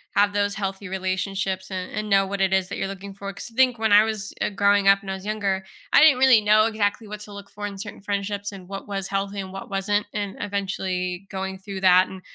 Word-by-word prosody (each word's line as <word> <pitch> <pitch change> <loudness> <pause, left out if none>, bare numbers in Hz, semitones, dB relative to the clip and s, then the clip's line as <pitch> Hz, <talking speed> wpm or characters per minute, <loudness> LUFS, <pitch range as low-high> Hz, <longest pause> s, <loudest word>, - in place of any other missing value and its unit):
have 205 0 +4
those 205 0 0
healthy 195 -1 -4
relationships 190 0 -2
and 185 -1 -5
and 215 0 -4
know 195 0 +4
what 195 0 -3
it 190 0 +2
is 190 -1 +2
that - - -5
you're 195 - -1
looking 195 0 -8
for, 200 0 -6
cause 200 +4 -9
think 255 -2 +4
when 220 -2 +2
I 210 +1 +8
was, 215 -1 -4
eh, - - +1
growing 200 0 +3
up 195 +1 +6
and 195 - -6
I - - -1
was 190 0 -8
younger, 200 -3 -1 0.3
I - - +7
didn't 300 -5 +7
really 255 -4 +6
know 215 +1 +5
exactly 215 0 -1
what 210 0 -7
to 210 -1 -10
look 200 0 -10
for 205 0 -5
in 200 -1 -8
certain 205 0 -8
friendships 205 0 -3
and 185 -2 -11
what 195 +1 -7
was 195 -1 -3
healthy 195 +1 -2
and 190 -1 -5
what 195 - -8
wasn't, 205 +1 0
and 205 -2 -3
eventually 190 -2 -3
going 190 -1 -4
through 195 -1 -7
that 185 0 +6
and 190 -1 -10
200 Hz, 250 wpm, -24 LUFS, 190-205 Hz, 0.3 s, I